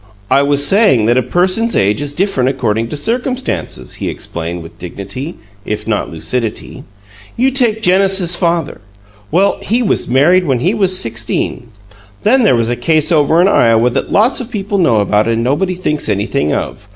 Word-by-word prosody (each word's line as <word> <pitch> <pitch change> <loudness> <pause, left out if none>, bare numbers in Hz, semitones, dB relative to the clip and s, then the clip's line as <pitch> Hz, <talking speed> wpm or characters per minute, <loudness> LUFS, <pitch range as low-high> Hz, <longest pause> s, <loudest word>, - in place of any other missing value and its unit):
"I 135 +1 +4
was 145 0 +4
saying 195 - +4
that 120 +2 +2
a - - +1
person's 185 - 0
age 105 +7 +1
is 145 -1 -3
different 145 -6 0
according 115 -3 -2
to 150 - -5
circumstances," 245 - -3
he - - -2
explained, 85 +1 -6
with 80 - -14
dignity, 100 - -6 0.3
if 105 0 -5
not 105 -2 -1
lucidity. 110 +8 -4 0.5
"You 260 +3 +2
take 235 -5 +1
Genesis's 190 -2 +3
father. 170 - -1 0.5
Well, 190 +5 +1
he 240 +3 0
was 215 - 0
married 160 +9 +3
when 130 -4 0
he 180 +8 +1
was 190 -4 +1
sixteen. 115 +1 -2 0.6
Then 255 +5 +3
there 210 - +3
was 115 0 0
a - - 0
case 155 +6 0
over 155 0 +3
in 185 - +4
Iowa 115 - +3
that 135 - -3
lots 225 +6 +2
of 250 -2 -6
people 200 -3 -3
know 120 - +3
about 105 +2 +1
and 115 0 0
nobody 180 +9 0
thinks 150 -7 -2
anything 105 - -1
of. 105 +1 -4
145 Hz, 175 wpm, -14 LUFS, 115-195 Hz, 0.6 s, I